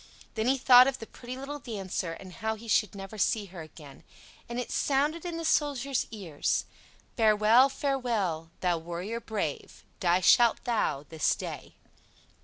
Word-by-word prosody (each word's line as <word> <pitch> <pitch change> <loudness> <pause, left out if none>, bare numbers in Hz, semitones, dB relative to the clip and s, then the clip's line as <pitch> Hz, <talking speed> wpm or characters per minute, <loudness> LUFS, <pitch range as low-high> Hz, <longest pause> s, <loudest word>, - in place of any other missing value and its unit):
Then 220 +1 -1
he 270 +1 +3
thought 250 0 +7
of 270 -1 -1
the 225 - -8
pretty 245 +3 -9
little 280 +2 -6
dancer, 195 -8 -4
and 185 +2 -11
how 220 +1 -3
he 225 +2 -12
should 210 -2 +1
never 195 +2 -8
see 210 +2 +1
her 175 - -7
again; 155 -3 -13 0.5
and 240 +1 -3
it 250 - -5
sounded 295 +5 0
in 340 -1 -4
the 330 - -4
Soldier's 280 -4 0
ears: 185 -10 -2 0.5
"Farewell, 220 +3 +5
farewell, 235 - -2
thou 175 -2 +1
warrior 175 +7 -5
brave, 210 -10 -5 0.2
Die 175 0 +2
shalt 235 +5 +5
thou 155 - -1
this 160 -2 +1
day." - - -8
220 Hz, 160 wpm, -28 LUFS, 180-255 Hz, 0.5 s, thought